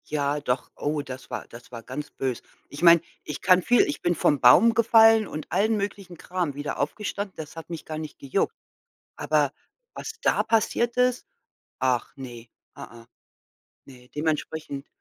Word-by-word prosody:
Ja, 145 -1 -1
doch. 125 -2 -2
Oh, 150 0 -2
das 130 -2 -9
war - - -5
das 120 +1 -14
war 115 -2 -8
ganz 145 +5 -6
böse. 130 -3 -3 0.3
Ich 145 - -9
meine, 170 -1 +7 0.2
ich 150 - -6
kann 185 -1 +5
viel 245 +7 +4
ich 295 - -3
bin 175 0 +1
vom 145 -2 +2
Baum 215 - +7
gefallen 225 -1 +6
und 155 -1 -7
allen 210 +5 +2
möglichen 200 -3 -5
Kram 180 -3 -3
wieder 145 +1 -4
aufgestanden. 200 +5 -3
Das 155 0 -8
hat 165 0 -9
mich 165 -2 -7
gar 155 - -5
nicht 155 -2 -7
gejuckt. 135 -2 -1 0.6
Aber 150 -3 +1 0.4
was 445 - -6
da - - +3
passiert 235 +1 +1
ist? 250 0 +1 0.5
Ach 130 -2 0
ne, 120 -3 -9 0.3
a 115 0 -11
a. - - -22 0.8
Ne, 125 -2 -16
dementsprechend 150 -2 -3
155 Hz, 170 wpm, -25 LUFS, 135-200 Hz, 0.8 s, meine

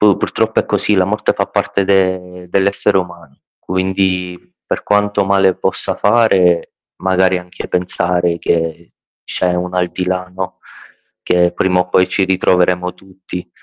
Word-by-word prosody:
pur 105 -3 +5
purtroppo - - -1
è - - -7
così, 105 - +1
la 95 - +3
morte 105 +3 0
fa - - -1
parte 100 - -1
de 95 -2 0
dell'essere 100 +1 +2
umano. 85 -6 -7 0.2
Quindi, 95 -1 -1 0.3
per - - -2
quanto 105 -1 +1
male 95 -1 +3
possa - - -2
fare, 100 -6 +3 0.3
magari 95 -1 +2
anche 90 0 -9
pensare 90 -1 0
che 80 0 -2 0.3
c'è 90 -1 -1
un 90 +1 -3
aldilà 90 0 -1
no, 95 -1 -5 0.6
che 90 0 +2
prima 90 -1 +1
o 90 - -2
poi 90 0 +3
ci 95 - +1
ritroveremo 90 -1 +1
tutti. 95 -1 -10
90 Hz, 140 wpm, -16 LUFS, 90-95 Hz, 0.6 s, pur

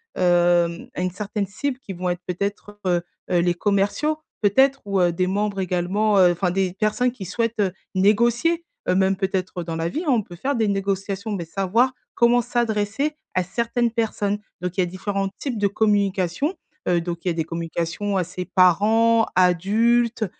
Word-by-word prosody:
hem, 175 -1 +2
à - - -3
une 185 0 -1
certaine 205 +2 -3
cible 255 +7 -3
qui 205 - -9
vont 180 0 -4
être 175 0 -2
peut-être, 200 +3 -4
heu, 175 -1 +2 0.3
heu, 175 - +3
les 175 0 +2
commerciaux, 205 - 0 0.2
peut-être, 265 +7 +4
ou, 200 -2 +1
heu, 175 -1 +3
des 180 +2 0
membres 200 +1 -1
également 190 +3 +1
heu, 180 -1 +6
enfin 175 +1 0
des 190 0 0
personnes 215 +5 +1
qui 225 -6 -8
souhaitent, 230 +3 -2
heu, 195 -3 +1 0.2
négocier, 235 - +3 0.3
heu, - - +3
même 190 0 +3
peut-être 185 -2 -2
dans 165 -1 -4
la 165 0 -1
vie, 315 - -3
hein, 295 - +2
on 240 -4 +3
peut 175 - -11
faire 275 +11 -2
des 225 -2 +1
négociations, 195 +1 -2
beh, 175 -4 -3
savoir 200 +9 +1 0.2
comment 240 +1 +4
s'adresser 235 +3 -1 0.2
à 185 - +1
certaines 235 +5 -1
personnes, 210 -3 -1 0.2
donc 180 +1 -4
il - - +4
y - - +3
a - - +1
différents 195 +2 -3
types 260 -5 -3
de 205 -1 +2
communication, 200 - +1 0.4
heu, 175 -1 +3
donc 170 0 -4
il 185 - 0
y - - +2
a - - -1
des 165 -1 -2
communications 170 +4 -3
à 185 - +2
ses 180 +1 -5
parents, 220 +6 +4
adultes 220 +6 +3
200 Hz, 190 wpm, -23 LUFS, 180-225 Hz, 0.4 s, heu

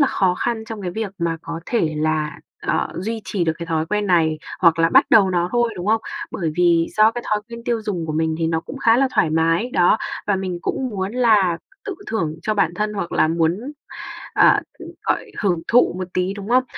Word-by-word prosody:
là 280 - +5
khó 185 -6 +1
khăn 225 +2 -2
trong 220 -2 -7
cái 180 - -3
việc 220 +1 -4
mà 170 -1 -1
có 165 0 -6
thể 165 -10 0
là, 155 0 -1 0.2
ờ, - - 0
duy 220 +5 -3
trì 190 -1 -1
được 160 - +1
cái 170 - -5
thói 160 -1 -1
quen 210 +1 -1
này 160 -4 +2 0.2
hoặc 165 -2 +5
là 165 - +4
bắt - - +6
đầu 195 -4 +6
nó 175 0 +1
thôi, 240 -1 +1
đúng 180 +2 -5
không? 220 +1 +3 0.3
Bởi 165 -4 -2
vì 170 -2 +3
do 215 +1 +6
cái 240 0 -6
thói 210 0 +1
quen 235 0 -9
tiêu 235 -2 -1
dùng 180 -6 -3
của 155 - -3
mình 160 0 0
thì 165 - 0
nó 160 0 0
cũng 270 - -9
khá 230 -2 +4
là 270 0 +3
thoải 195 -8 +3
mái, 165 +8 +1
đó, 180 +4 +4 0.3
và 205 -2 +2
mình 185 -2 -3
cũng 260 - -2
muốn 195 0 -3
là 210 -9 +3 0.3
tự 405 - -4
thưởng 165 -8 -2
cho 215 - 0
bản 175 -4 +1
thân 210 +2 -1
hoặc 195 -4 -4
là 155 - +3
muốn, 165 +4 +1 0.7
à, - - +5 0.4
gọi, - - -2
hưởng 175 -5 0
thụ 245 -5 +4
một 185 -1 -4
tí, 185 +2 0
đúng 200 +1 -8
không? 255 +1 +4
185 Hz, 230 wpm, -21 LUFS, 165-220 Hz, 0.7 s, bắt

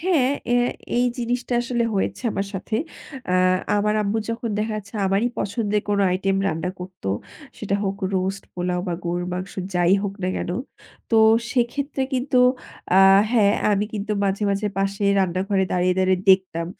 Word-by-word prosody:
হ্যাঁ, 325 -7 +2 0.2
অ্যা 245 0 +3 0.3
এই 245 - +3
জিনিসটা 245 +1 -2
আসলে 240 -1 -1
হয়েছে 195 - -2
আমার 195 - -2
সাথে। 205 +3 -3 0.5
অ্যা 180 - +2 0.4
আমার 210 +1 +1
আম্মু 205 +2 0
যখন 230 0 -3
দেখা 215 +1 -1
যাচ্ছে 200 +1 -9
আমারই 195 +5 +2
পছন্দের 205 0 -1
কোন 205 -1 +1 0.2
item 195 +1 0
রান্না 180 -1 -1
করতো 180 - -7 0.5
সেটা 200 -2 -2
হোক 195 0 -2 0.2
রোস্ট, 190 +1 -1
পোলাও 180 0 -1
বা 175 - -1
গরুর 175 +1 -2
মাংস 185 +2 -5 0.2
যাই 175 0 +3
হোক 200 -1 -3
না 185 - 0
কেন। - - -3 0.6
তো 225 - +4 0.3
সেক্ষেত্রে 270 +3 -1
কিন্তু 255 0 +1 0.6
আ - - +8 0.3
হ্যাঁ 210 -4 +4 0.2
আমি 205 0 +1
কিন্তু 210 0 -3
মাঝে, 195 +1 -1
মাঝে 200 +1 0
পাশে 195 +1 -1
রান্নাঘরে 190 +1 +1
দাঁড়িয়ে, 180 0 +2
দাঁড়িয়ে 185 -1 +2
দেখতাম 185 -3 +2
200 Hz, 160 wpm, -23 LUFS, 185-230 Hz, 0.6 s, আ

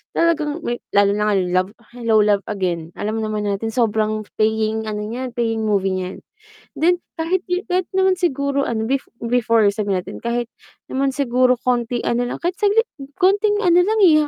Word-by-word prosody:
talagang 320 -1 +1
may 240 0 -2 0.2
lalo 200 0 +5
na 210 +1 +1
nga - - +2
love 185 +1 0 0.2
Hello 230 -2 0
Love 205 -1 +2
Again, 175 -5 -3
alam 215 +2 -2
naman 215 -1 -2
natin 205 +2 -2
sobrang 215 -2 +1 0.2
paying 220 0 +1
ano 210 0 -3
niyan, 245 +3 -5
paying 225 -2 0
movie 195 -2 +1
niyan. 185 +1 -6 0.5
Then, 355 +2 +2 0.2
kahit 355 +3 -1 0.2
kahit 365 0 +1
naman 380 -1 +3
siguro 280 -4 0
ano 220 -2 -1
bef 270 0 -1 0.2
before 230 -2 +2
sabihin 200 -3 -1
natin - - -8
kahit 235 0 -1 0.5
naman 270 +1 +1
siguro 255 -2 +3
konting 240 -1 0
ano 245 +1 0
lang, - - -5
kahit 350 +1 -1
saglit 430 +3 +3 0.3
konting 405 +3 +3
ano 350 0 +5
lang 430 +4 +2
eh, 305 -4 +5
235 Hz, 170 wpm, -20 LUFS, 215-310 Hz, 0.5 s, lalo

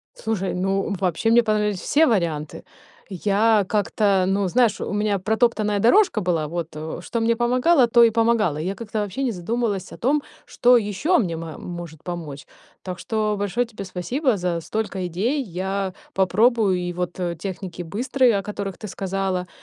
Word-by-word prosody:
Слушай, 210 -4 -2
ну, 195 +3 -1
вообще 185 +4 +1
мне 240 +1 +6
понравились 210 -3 0
все 320 +2 +3
варианты. 170 - -1 0.5
Я 205 +3 +2
как-то, 200 -1 +2
ну, 195 0 +1
знаешь, 230 +2 +2
у - - -3
меня 205 -1 0
протоптанная 215 0 +1
дорожка 245 - +4
была. 170 -5 0
Вот, 170 +1 -4
э, 155 +2 -5
что 235 - -3
мне 230 +1 +2
помогало, 250 +4 +3
то 235 0 +6
и 230 - +5
помогало. 225 -7 +2
Я 185 +5 -3
как-то 220 -1 -4
вообще 210 +7 -3
не 245 - 0
задумалась 200 +1 -2
о - - -11
том, 280 +4 +1 0.2
что 245 0 +4
ещё 230 - +1
мне 170 -7 -1
ма 160 -1 -7
может 170 -3 -8
помочь. 160 -5 -6 0.4
Так 180 -2 -6
что 215 0 -1
большое 205 +5 -1
тебе 215 -3 -8
спасибо 225 - -1
за 175 -2 -2
столько 190 0 -3
идей. 235 - -1
Я 190 -1 -3 0.2
попробую 200 +1 +3
и 175 0 -3
вот, 180 +1 -4
э, 175 -2 -2
техники 180 0 -6
быстрые, 240 +5 +1
о - - -3
которых 200 -2 -5
ты 215 - -7
сказала, 190 -2 -2
200 Hz, 170 wpm, -23 LUFS, 180-230 Hz, 0.5 s, мне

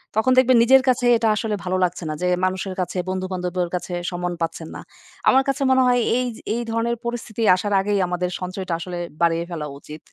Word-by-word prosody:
তখন 220 +4 +2
দেখবেন, 255 -1 +5
নিজের 265 +2 +6
কাছে 245 0 +1
এটা 225 0 0
আসলে 215 -1 -1
ভালো 185 +1 -1
লাগছে 175 0 -1
না - - -2
যে 180 - +1 0.2
মানুষের 185 0 -2
কাছে, 180 +1 -4
বন্ধুবান্ধবের 185 -1 -2
কাছে 180 0 -4 0.2
সম্মান 175 0 -3
পাচ্ছেন 165 0 -3
না। - - -7 0.5
আমার 265 +1 +5
কাছে 275 0 -1
মনে 260 0 +5
হয়, 245 -1 +3
এইয 250 0 0 0.3
এই 240 - -2
ধরনের 230 +1 0
পরিস্থিতি 235 -2 -4
আসার 205 +2 -2
আগেই 205 0 0
আমাদের 180 0 -2
সঞ্চয়টা 185 0 -4
আসলে 175 0 -5 0.2
বাড়িয়ে 170 0 +2
ফেলা 155 -3 -4
উচিত। 150 +2 -10
185 Hz, 195 wpm, -22 LUFS, 180-235 Hz, 0.5 s, নিজের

